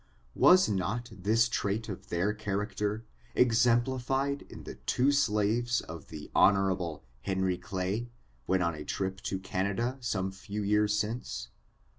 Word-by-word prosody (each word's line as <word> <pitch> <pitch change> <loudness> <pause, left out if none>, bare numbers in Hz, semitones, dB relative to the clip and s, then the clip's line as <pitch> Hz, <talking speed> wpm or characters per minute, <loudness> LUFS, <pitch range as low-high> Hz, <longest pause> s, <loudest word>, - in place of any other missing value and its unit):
Was 185 +1 +6
not 105 +5 -1
this 110 +4 +2
trait 110 -1 -1
of 100 -4 -7
their 90 +5 +1
character 105 +1 -2 0.3
exemplified 125 +3 +2
in - - -10
the - - -7
two 130 +3 +1
slaves 120 -2 +2
of 85 +1 -9
the 75 -2 -9
Hon. 95 -5 +3 0.2
Henry 95 0 0
Clay, 95 +6 -3 0.4
when 95 -1 +2
on 85 -1 +1
a 75 -1 -7
trip 95 +2 -3
to 95 - -2
Canada, 100 +7 -1
some 95 -5 -1
few 100 +2 -5
years 105 +1 +2
since 105 - -3
105 Hz, 135 wpm, -30 LUFS, 95-120 Hz, 0.4 s, Was